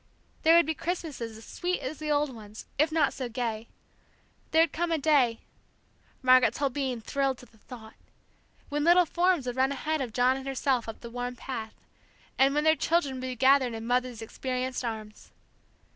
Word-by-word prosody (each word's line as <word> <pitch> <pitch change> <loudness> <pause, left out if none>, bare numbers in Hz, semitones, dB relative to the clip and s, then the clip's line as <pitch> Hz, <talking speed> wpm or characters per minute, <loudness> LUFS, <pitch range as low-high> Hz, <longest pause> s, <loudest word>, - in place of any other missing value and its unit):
There 325 +1 +6
would 340 - +6
be 320 - -1
Christmases 300 -10 -4
as 225 - -13
sweet 360 +1 -2
as 280 +4 -6
the 305 0 -4
old 295 -2 +1
ones, 215 -1 -11
if 305 +2 +3
not 310 -3 +2
so 255 -2 -5
gay; 230 -2 -3 0.8
there 320 +1 +5
would 330 - -2
come 345 +1 -1
a 325 - +2
day 275 -6 +2 0.8
Margaret's 255 0 +5
whole 280 -2 0
being 260 -4 -2
thrilled 270 +2 -1
to 250 - -14
the 225 -2 -25
thought 220 -2 -12 0.8
when 290 0 -1
little 350 +2 +6
forms 345 -3 +1
would 245 0 -4
run 265 +1 +2
ahead 305 +2 -2
of 250 -3 -3
John 250 +3 +2
and 270 0 -8
herself 265 -3 0
up 225 - -8
the 235 - -9
worn 245 +1 -4
path, 225 -3 -6 0.6
and 270 +1 +4
when 300 - +2
their 315 0 +5
children 320 -4 +1
would - - -6
be 255 0 -4
gathered 260 -1 +4
in 225 0 -6
Mother's 245 -1 -1
experienced 255 +2 -3
arms! 215 -2 -6
260 Hz, 190 wpm, -28 LUFS, 240-300 Hz, 0.8 s, There